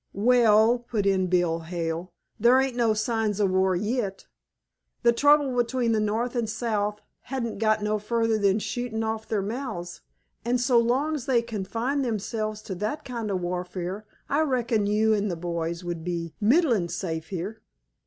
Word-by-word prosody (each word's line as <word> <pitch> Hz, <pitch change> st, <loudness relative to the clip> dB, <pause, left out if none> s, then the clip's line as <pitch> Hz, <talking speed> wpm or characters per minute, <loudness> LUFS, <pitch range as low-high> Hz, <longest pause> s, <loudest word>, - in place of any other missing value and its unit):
"Well," 225 Hz, +1 st, +4 dB
put 230 Hz, -4 st, -2 dB
in 190 Hz, -2 st, +2 dB
Bill 175 Hz, -2 st, +1 dB
Hale, 165 Hz, +1 st, -4 dB, 0.3 s
"there 240 Hz, +4 st, +6 dB
ain't 265 Hz, -2 st, 0 dB
no 230 Hz, -3 st, +2 dB
signs 215 Hz, -1 st, 0 dB
of 200 Hz, -2 st, +2 dB
war 190 Hz, 0 st, +2 dB
yit; 210 Hz, 0 st, -2 dB, 0.8 s
the 235 Hz, -, +6 dB
trouble 285 Hz, +1 st, +4 dB
between 240 Hz, 0 st, +1 dB
the 220 Hz, -, +2 dB
North 225 Hz, +4 st, -1 dB
and 235 Hz, -3 st, -1 dB
South 210 Hz, -2 st, -1 dB, 0.3 s
hain't 245 Hz, -5 st, -3 dB
got 215 Hz, -1 st, +2 dB
no 210 Hz, 0 st, 0 dB
further 225 Hz, +1 st, 0 dB
than 200 Hz, -1 st, +3 dB
shootin' 225 Hz, 0 st, -3 dB
off 220 Hz, 0 st, -3 dB
their 210 Hz, -3 st, -1 dB
mouths, 200 Hz, -6 st, -5 dB, 0.4 s
an' 240 Hz, +1 st, +1 dB
so 245 Hz, 0 st, +3 dB
long's 265 Hz, +4 st, 0 dB
they 240 Hz, -3 st, +3 dB
confine 230 Hz, +5 st, -2 dB
themselves 215 Hz, -2 st, -3 dB
to 190 Hz, -, -5 dB
that 220 Hz, +8 st, -2 dB
kind 235 Hz, -4 st, -4 dB
of 190 Hz, -2 st, -1 dB
warfare 180 Hz, +3 st, -4 dB, 0.2 s
I 290 Hz, +3 st, +1 dB
reckon 235 Hz, -7 st, +1 dB
you 215 Hz, +1 st, +3 dB
an' 210 Hz, -1 st, 0 dB
th' 170 Hz, -2 st, -4 dB
boys 170 Hz, 0 st, -3 dB
would 170 Hz, -2 st, -4 dB
be 170 Hz, -2 st, -3 dB
middlin' 230 Hz, -, +3 dB
safe 160 Hz, -2 st, -4 dB
here." 195 Hz, +4 st, -5 dB
215 Hz, 165 wpm, -26 LUFS, 190-240 Hz, 0.8 s, there